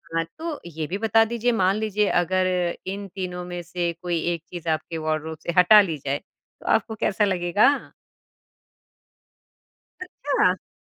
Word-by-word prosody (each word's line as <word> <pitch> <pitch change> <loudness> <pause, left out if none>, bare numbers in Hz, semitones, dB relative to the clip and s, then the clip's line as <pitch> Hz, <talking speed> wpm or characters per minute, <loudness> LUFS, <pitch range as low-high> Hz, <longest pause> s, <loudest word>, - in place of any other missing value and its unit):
हाँ, 165 - +2
तो 320 -2 -4
ये 160 -2 -5
भी 185 - -3
बता 225 +1 +4
दीजिए 235 +1 0
मान 190 -4 +2
लीजिए 210 -1 0
अगर 185 +1 +2 0.4
इन 200 +1 -4
तीनों 180 -2 -4
में 175 0 -5
से 175 0 -2
कोई 175 -2 -1
एक 170 -1 -6
चीज़ 170 -2 -5
आपके 160 +1 -2
वार्डरोब 155 0 -2
से 170 - -1
हटा 210 +4 +8
ली 165 -6 -2
जाए, 140 +1 0
तो - - -26
आपको 220 - +1
कैसा 210 0 +1
लगेगा? 195 +8 +2 2.1
अच्छा। 280 - -1
185 Hz, 150 wpm, -24 LUFS, 170-210 Hz, 2.1 s, हटा